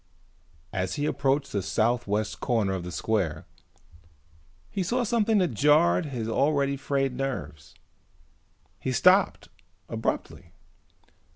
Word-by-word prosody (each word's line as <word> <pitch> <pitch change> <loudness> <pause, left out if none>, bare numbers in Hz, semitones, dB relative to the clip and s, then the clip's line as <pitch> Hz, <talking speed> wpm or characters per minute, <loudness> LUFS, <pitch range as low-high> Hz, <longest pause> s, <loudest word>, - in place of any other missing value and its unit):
As 95 -1 -2
he 145 - -1
approached 140 -1 0
the 100 - -1
south 115 +5 0
west 105 +1 -1
corner 110 -6 0
of 95 -2 -3
the 90 - -6
square 90 -5 -1 1.2
he 195 - -3
saw 240 +8 0
something 225 -1 +2
that 180 -9 +1
jarred 105 - +3
his 120 -6 -4
already 140 +3 +1
frayed 135 -1 -1
nerves. 75 - -5 1.0
He - - -2
stopped - - +3 0.4
abruptly. - - -4
125 Hz, 115 wpm, -27 LUFS, 95-145 Hz, 1.2 s, jarred